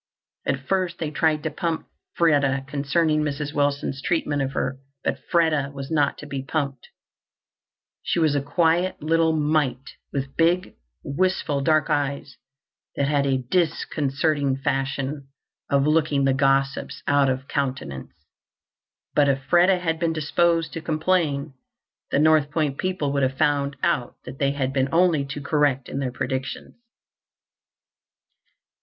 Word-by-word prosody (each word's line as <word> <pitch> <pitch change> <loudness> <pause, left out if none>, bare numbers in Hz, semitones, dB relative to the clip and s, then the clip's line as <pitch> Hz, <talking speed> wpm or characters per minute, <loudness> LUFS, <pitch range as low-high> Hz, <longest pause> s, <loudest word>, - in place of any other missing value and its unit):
At 135 0 0
first 185 -3 0
they 155 -2 -3
tried 155 -1 +1
to 160 - -2
pump 165 +1 -2 0.3
Freda 140 -5 +2
concerning 150 +3 +1
Mrs. 145 0 -3
Wilson's 145 -2 0
treatment 150 -3 0
of 135 0 -2
her, 130 +1 -2 0.2
but - - -1
Freda 155 -5 +2
was 135 +1 -7
not 145 -3 +2
to - - -9
be 140 -2 -4
pumped. 135 -2 -3 1.1
She - - -1
was 160 -3 +3
a 145 - +1
quiet 170 +5 +1
little 165 +1 +3
mite, 145 -4 0 0.2
with 135 -1 -4
big, 175 +3 +2 0.3
wistful 150 -2 0
dark 155 +2 +2
eyes 140 -1 -2 0.6
that 140 - 0
had 140 -1 +2
a 130 -1 0
disconcerting 145 -3 0
fashion 135 +1 -2 0.4
of 140 -1 +3
looking 150 -3 +2
the 135 - +3
gossips 135 0 0
out 140 -1 +3
of 130 +1 -2
countenance. 130 - -3 1.0
But 145 -1 +4
if 135 0 0
Freda 180 +4 +4
had 165 -2 -1
been 165 -1 +1
disposed 165 +2 +1
to 165 - -5
complain, 155 -3 0 0.6
the - - +1
North 155 -1 +4
Point 150 -3 -1
people 180 -7 -1
would 140 - +1
have 135 0 0
found 140 -1 +1
out 125 -4 0
that 130 +1 -9
they 140 0 +1
had 135 -2 -2
been 135 0 +1
only 165 -4 +3
too 145 +1 -6
correct 145 -3 +1
in 135 - -4
their 130 -2 -2
predictions. 130 +2 -4
145 Hz, 145 wpm, -24 LUFS, 135-160 Hz, 1.1 s, But